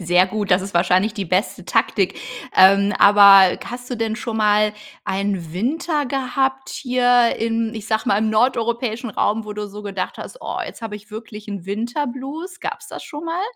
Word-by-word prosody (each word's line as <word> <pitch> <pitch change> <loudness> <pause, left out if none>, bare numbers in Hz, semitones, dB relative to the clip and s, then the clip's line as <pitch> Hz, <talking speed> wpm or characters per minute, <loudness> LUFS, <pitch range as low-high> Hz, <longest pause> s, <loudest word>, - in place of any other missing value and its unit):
Sehr 180 +1 +3
gut, 205 +1 -4
das 180 +1 +4
ist 195 +1 -7
wahrscheinlich 185 +4 +2
die 200 -3 -3
beste 185 +6 -1
Taktik. - - 0 0.4
Ähm, 195 +2 +6
aber 200 -2 +7
hast 245 +1 -8
du 245 - -2
denn 220 -1 -2
schon 235 -2 -4
mal 210 0 +3 0.3
einen 190 -4 -2
Winter 290 - -1
gehabt 265 0 -1
hier 245 -2 +2
in, 225 0 -1
ich 215 -1 -7
sage 220 0 0
mal, 200 - +3
„im 220 0 0
nordeuropäischen 235 0 0
Raum“, 215 +2 0
wo 210 - -6
du 210 0 -5
so 205 +1 -10
gedacht 195 -2 -4
hast: - - -9
„Oh, - - -5
jetzt - - -10
habe 215 -2 -5
ich 210 +2 -17
wirklich 215 -1 -9
'n 195 -3 -6
Winter 235 +8 -2
Blues“, 295 +8 -7
gab's - - -6
das - - -8
schon 295 +3 -8
mal? 335 +3 -2
220 Hz, 190 wpm, -20 LUFS, 200-245 Hz, 0.4 s, aber